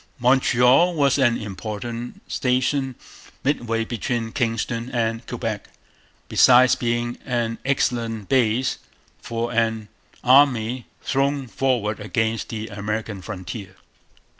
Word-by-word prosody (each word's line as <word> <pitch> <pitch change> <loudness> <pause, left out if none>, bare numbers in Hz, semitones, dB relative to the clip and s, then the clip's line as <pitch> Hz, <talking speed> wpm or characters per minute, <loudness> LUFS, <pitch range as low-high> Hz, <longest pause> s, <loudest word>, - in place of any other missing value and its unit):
Montreal 130 +6 +4
was 140 -2 +3
an 120 -3 +3
important 110 +3 -6
station 130 +1 0 0.5
midway 115 -5 0
between 115 0 -3
Kingston 115 -1 -2
and 115 -1 -1
Quebec, - - -4 0.6
besides 125 0 +6
being 120 0 -1
an 120 -3 -2
excellent 115 -6 -1
base 125 -1 +1 0.4
for 115 +1 -3
an 110 -2 0 0.3
army 125 -2 +4 0.2
thrown 140 0 0
forward 115 -2 -1
against 110 +1 -1
the 110 -1 -4
American 105 0 -4
frontier. 95 +1 -7
120 Hz, 100 wpm, -23 LUFS, 110-130 Hz, 0.6 s, besides